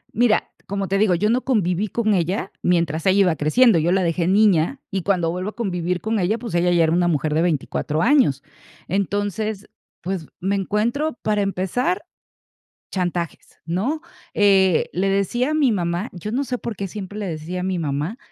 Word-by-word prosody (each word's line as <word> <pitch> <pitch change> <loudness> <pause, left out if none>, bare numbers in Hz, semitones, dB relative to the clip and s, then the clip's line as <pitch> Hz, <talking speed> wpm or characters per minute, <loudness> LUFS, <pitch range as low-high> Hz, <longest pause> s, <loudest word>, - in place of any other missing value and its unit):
Mira, 230 -1 +2 0.2
como 195 -1 -2
te 195 +1 0
digo, 200 -5 +3
yo 210 +6 +1
no 250 +2 +2
conviví 205 -5 +1
con 215 +1 0
ella 185 +2 -1
mientras 170 -3 +1
ella 190 +2 +4
iba 180 -4 +3
creciendo, 170 - +4
yo 170 +3 +1
la 190 -1 +2
dejé 170 0 0
niña, 200 - +3
y 190 -1 -1
cuando 175 -3 +1
vuelvo 185 +3 -3
a - - -11
convivir 180 -5 -2
con 220 -1 -1
ella, 200 +5 +1
pues, 230 -5 -7
ella 175 +1 +2
ya 170 -1 +4
era 160 - +2
una 175 0 +2
mujer 155 -2 0
de 160 - +2
24 155 -1 -1
años. 235 - +3 0.4
Entonces, 205 +2 -2 0.3
pues 180 -3 -4
me 195 +2 0
encuentro, 235 +9 -1
para 210 -1 +1
empezar, 195 - -1 0.9
chantajes, 175 -3 -3
¿no?, 220 - -2 0.3
eh, 190 -4 +4
le 190 +3 0
decía 200 - 0
a - - 0
mi 280 -7 +3
mamá, 175 +2 -2
yo 185 +4 -6
no 275 +3 0
sé 250 -1 -3
por 230 -4 -5
qué 195 -1 -4
siempre 205 +1 -7
le 205 - -3
decía 165 +3 -4
a - - -3
mi 185 -1 -1
mamá 150 - -2
190 Hz, 190 wpm, -22 LUFS, 175-215 Hz, 0.9 s, ella